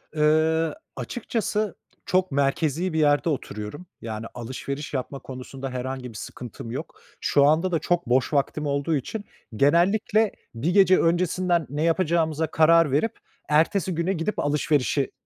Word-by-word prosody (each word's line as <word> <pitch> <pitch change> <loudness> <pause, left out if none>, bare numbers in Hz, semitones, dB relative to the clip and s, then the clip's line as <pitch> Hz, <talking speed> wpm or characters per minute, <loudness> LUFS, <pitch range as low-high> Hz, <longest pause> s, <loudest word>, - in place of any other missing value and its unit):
Iıı, 155 +1 +2 0.2
açıkçası 215 -3 -2 0.3
çok 185 -3 +1
merkezi 150 +5 0
bir 160 - +1
yerde 145 +2 +3
oturuyorum. 130 - -5 0.2
Yani, 110 -1 -5
alışveriş 135 +4 -6
yapma 135 +1 -3
konusunda 130 +1 -7
herhangi 130 0 -4
bir 115 - -13
sıkıntım 120 -1 -8
yok. 145 +7 -7 0.2
Şu 140 -1 +4
anda 160 +5 +3
da 165 - +1
çok 175 +3 0
boş 130 +4 +2
vaktim 150 +1 0
olduğu 140 +2 0
için 205 - -4 0.3
genellikle 195 - +3 0.2
bir 145 +10 0
gece 190 -2 +6
öncesinden 175 0 +1
ne 145 +3 -2
yapacağımıza 165 -2 +1
karar 160 0 +4
verip 215 +12 0 0.3
ertesi 165 +4 +2
güne 170 +4 0
gidip 190 +4 -2
alışverişi 145 -2 +1
155 Hz, 140 wpm, -25 LUFS, 140-175 Hz, 0.3 s, gece